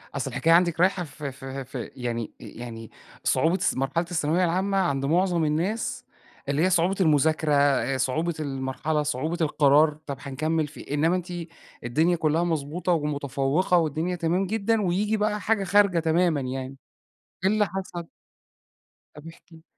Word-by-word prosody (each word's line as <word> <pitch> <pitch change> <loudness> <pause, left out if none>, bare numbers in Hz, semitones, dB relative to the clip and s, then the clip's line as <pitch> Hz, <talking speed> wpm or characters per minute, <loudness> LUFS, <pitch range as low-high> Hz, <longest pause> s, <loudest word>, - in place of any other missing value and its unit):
أصل 135 -1 -3
الحكاية 135 +7 +3
عندِك 170 -1 +3
رايحة 185 0 +3
في 145 -2 -7
في 135 +1 -7
في 130 - -7
يعني 120 -3 -3
يعني 115 -2 -9 0.3
صعوبة 165 +2 +2
الث 190 - 0
مرحلة 150 +6 0
الثانوية 165 +2 +1
العامة 190 +3 0
عند 140 -8 +1
مُعظم 170 +2 +2
الناس 175 +10 -1 0.4
اللي 140 +2 +1
هي 185 - +4
صعوبة 180 +1 +2
المذاكرة، 145 -4 +2
صعوبة 155 +7 0
المرحلة، 140 +2 -2
صعوبة 150 +4 -2
القرار، 150 0 +4
طب 140 -2 -5
هنكمّل 155 +3 -1
في 150 - -13
إيه؟ - - -7
إنّما 160 +4 +2
أنتِ 180 -1 -3 0.6
الدنيا 155 +9 +2
كُلّها 160 0 +1
مظبوطة 165 +1 -1
ومتفوّقة 145 +3 0
والدنيا 165 +2 0
تمام 175 +3 0
جدًا 220 +2 +1
وييجي 205 +4 0
بقى 210 0 0
حاجة 215 0 +1
خارجة 195 -2 +3
تمامًا 165 -1 +2
يعني، 130 +1 -5 0.7
إيه 190 - +4
اللي 215 -1 +3
حصل؟ 180 -2 -6 1.1
طب 150 +2 -11
احكي 165 0 -15
160 Hz, 150 wpm, -25 LUFS, 140-180 Hz, 1.1 s, هي